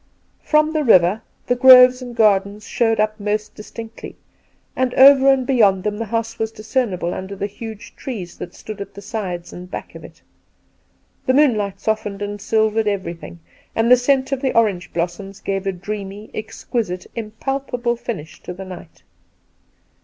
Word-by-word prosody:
From 305 +1 +2
the 310 -1 +1
river 190 -3 +4 0.2
the 245 - +2
groves 250 0 +8
and 245 -1 -8
gardens 205 -1 +2
showed 225 -2 +1
up 215 +1 0
most 210 +1 -2
distinctly, 225 +1 -9 0.6
and 255 -1 0
over 275 0 +8
and 265 -2 +1
beyond 205 -8 +3
them 210 0 -2
the 230 - -2
house 230 +1 -3
was 220 0 -1
discernible 215 -6 -2
under 190 +1 -6
the 200 - -3
huge 215 +1 -9
trees 195 -10 -6
that 175 - -8
stood 215 -2 -8
at 200 0 -8
the 200 - -9
sides 185 -6 -5
and 180 +1 -9
back - - -7
of - - -11
it. - - -14 1.0
The 260 - +3
moonlight 210 -9 +2
softened 210 -2 -2
and 205 0 -5
silvered 220 0 +1
everything, 170 - -4 0.3
and 225 +2 +2
the - - +11
scent 265 +1 +1
of 270 -1 -1
the 260 -3 0
orange 205 -6 +1
blossoms 180 +3 -4
gave 195 0 -3
a - - +2
dreamy, 200 +2 -7
exquisite, 215 -3 -4
impalpable 240 +2 -3
finish 195 -10 -7
to 180 - -7
the 190 +1 -8
night. 180 -3 -11
215 Hz, 165 wpm, -20 LUFS, 195-245 Hz, 1.0 s, the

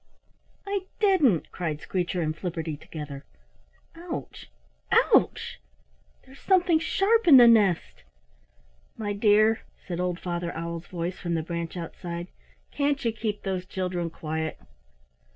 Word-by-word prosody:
"I 395 -1 -3
didn't," 325 - +3
cried 160 -4 -3
Screecher 180 +1 -2
and 155 0 -2
Flipperty, 165 -3 -4
together. 145 -2 -8 0.7
"Ouch! - - -7 0.4
Ouch! - - +3 0.7
There's 270 +1 -16
something 355 -4 +3
sharp 390 +6 +2
in 285 -5 +10
the 240 -1 +9
nest." 190 - +3 1.0
"My 205 -2 -2
dear," 215 +1 +4 0.2
said 175 -2 -4
old 180 -1 -1
Father 175 -1 -3
Owl's 170 +1 -5
voice 175 0 -4
from 170 -1 -2
the 160 - -1
branch 170 +1 -4
outside, 170 +1 -6 0.4
"can't 285 -2 0
you 230 - +3
keep 215 -2 -4
those 185 -2 -3
children 180 -3 -2
quiet?" 160 0 -4
180 Hz, 125 wpm, -26 LUFS, 170-230 Hz, 1.0 s, in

